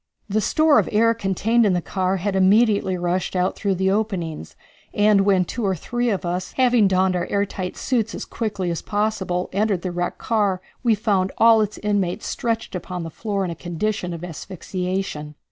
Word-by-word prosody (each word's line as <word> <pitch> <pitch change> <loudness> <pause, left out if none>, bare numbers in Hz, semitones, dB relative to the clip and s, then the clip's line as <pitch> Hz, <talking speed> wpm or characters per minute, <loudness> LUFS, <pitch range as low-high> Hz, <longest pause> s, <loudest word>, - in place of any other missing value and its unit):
The 215 +1 0
store 310 +8 +4
of - - -1
air 230 +1 +4
contained 225 +2 +1
in 205 -4 +3
the 180 - +2
car 185 +2 -1
had 195 +2 -2
immediately 200 0 +3
rushed 175 +2 -1
out 180 +1 +1
through 200 -2 -1
the 190 +1 +1
openings, 185 - -2 0.4
and 205 -1 +4
when 195 -2 +3
two 235 +6 -4
or 190 -2 +1
three 240 +8 -2
of 195 -4 -1
us, 180 +1 -3
having 245 -5 +4
donned 185 0 +2
our 175 - -1
air 200 0 +1
tight 185 -2 -5
suits 230 -4 -1
as - - -5
quickly 200 -6 -3
as 170 - -3
possible, 205 -4 -1
entered 200 -2 0
the 185 - -2
wrecked 175 0 -2
car 205 -5 0 0.2
we 235 -3 +3
found 200 -3 0
all 225 -1 +6
its 210 0 -2
inmates 200 -4 -1
stretched 230 -2 -2
upon 180 -1 -5
the 165 - -6
floor 200 +1 -2
in 175 - -3
a - - -5
condition 180 +3 -3
of 170 0 -6
asphyxiation. 180 -2 -4
195 Hz, 195 wpm, -22 LUFS, 180-215 Hz, 0.4 s, all